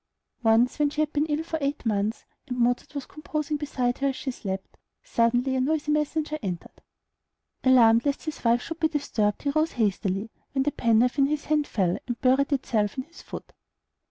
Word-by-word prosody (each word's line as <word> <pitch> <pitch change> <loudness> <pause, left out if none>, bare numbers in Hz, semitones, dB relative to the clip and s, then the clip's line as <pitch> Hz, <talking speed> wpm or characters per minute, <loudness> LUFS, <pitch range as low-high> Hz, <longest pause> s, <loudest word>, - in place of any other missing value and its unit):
Once 230 +4 +3
when 295 -1 +3
she 300 - -6
had 310 0 +1
been 295 +1 +1
ill 300 +1 -1
for 320 -1 -3
eight 280 -1 -2
months, 210 0 -1 0.2
and 250 -2 -4
Mozart 245 +4 0
was 280 - -3
composing 305 0 -3
beside 255 -4 -1
her 275 - +1
as 270 - -1
she 265 - -3
slept, 195 -5 -6 0.3
suddenly 245 +3 +1
a 260 - +1
noisy 300 +2 0
messenger 300 0 0
entered. 180 -5 -6 0.8
Alarmed 235 -3 +6
lest 285 -1 -1
his 310 - -5
wife 235 +1 +3
should 330 0 -6
be 320 - +3
disturbed, 230 -9 -1
he 285 - +1
rose 310 +2 +1
hastily, 205 -1 -1 0.2
when 270 -1 +2
the 295 - +1
penknife 235 +3 +2
in 275 - +5
his 295 0 -2
hand 300 -1 +1
fell, 180 -4 0
and 240 -2 -3
buried 265 +3 +3
itself 220 -6 0
in 260 - -1
his 335 +5 -15
foot. - - -9
265 Hz, 195 wpm, -26 LUFS, 230-300 Hz, 0.8 s, Alarmed